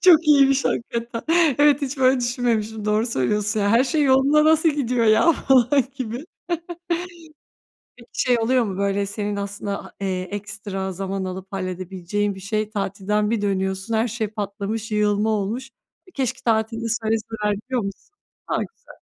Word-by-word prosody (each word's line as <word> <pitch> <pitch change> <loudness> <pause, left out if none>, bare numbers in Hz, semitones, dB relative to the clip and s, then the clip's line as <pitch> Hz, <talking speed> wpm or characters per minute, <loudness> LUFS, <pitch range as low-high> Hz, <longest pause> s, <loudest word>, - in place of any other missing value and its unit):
Çok 335 -3 +6
iyiymiş 275 -2 +5
hakikaten. 235 0 -2 0.4
Evet, 290 -1 +5
hiç 275 0 -3
böyle 260 -1 +4
düşünmemiştim, 230 -3 -1
doğru 215 +2 +1
söylüyorsun. 210 - 0
Ya 200 0 +2
her 235 +4 +5
şey 300 +2 +1
yoluna 275 +3 +4
nasıl 320 +1 +4
gidiyor 250 -5 0
ya? 220 +10 +5
Falan 265 -1 +3
gibi. 255 +1 -5 1.7
Peki 235 -1 -16
şey 245 -2 +2
oluyor 245 +2 +2
mu? 195 -2 -4
Böyle 200 0 0
senin 205 +1 -3
aslında 200 0 -4
ha - - -12
eee, 185 -2 -1
ekstra 200 -1 -5
zaman 195 +1 -3
alıp 185 +1 -6
halledebileceğin 190 +2 -3
bir - - -10
şeyi 215 +2 -2
tatilden 210 0 -1
bir 225 - 0
dönüyorsun, 190 +1 -1
her 220 +2 +2
şey 225 -1 -2
patlamış, 210 +1 -4
yığılma 210 0 +2
olmuş. 220 +5 -2 0.4
Keşke 255 -1 -2
tatilde 225 0 0
söyleseler 220 -2 -1
diyor 255 -3 0
musun? 195 - -7 0.4
A, - - 0
güzel. - - -15
220 Hz, 150 wpm, -22 LUFS, 200-250 Hz, 1.7 s, Çok